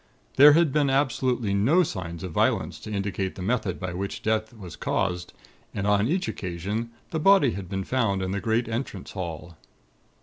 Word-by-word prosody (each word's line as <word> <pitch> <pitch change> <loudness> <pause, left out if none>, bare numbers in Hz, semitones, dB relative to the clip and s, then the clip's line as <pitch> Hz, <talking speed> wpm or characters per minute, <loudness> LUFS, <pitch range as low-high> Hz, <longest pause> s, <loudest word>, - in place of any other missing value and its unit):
There 145 +2 +9
had 160 -3 +3
been 145 -2 +2
absolutely 130 -5 +1
no 135 - +4
signs 85 - -5
of 90 - -5
violence - - 0
to 110 - -8
indicate 100 -2 -2
the 90 - -6
method 105 -4 -1
by 95 -1 -4
which 100 +2 -5
death 110 0 0
was 100 -8 -10
caused, 90 -2 -2 0.4
and 100 - -2
on 105 +1 +3
each 180 +5 0
occasion 100 +6 -4 0.2
the 160 - -1
body 190 -6 +5
had 95 -4 -6
been 95 0 -2
found 100 -5 0
in 95 - -2
the 100 0 -2
great 115 +1 0
entrance 115 -4 -4
hall. 85 -3 -6
105 Hz, 180 wpm, -26 LUFS, 95-125 Hz, 0.4 s, There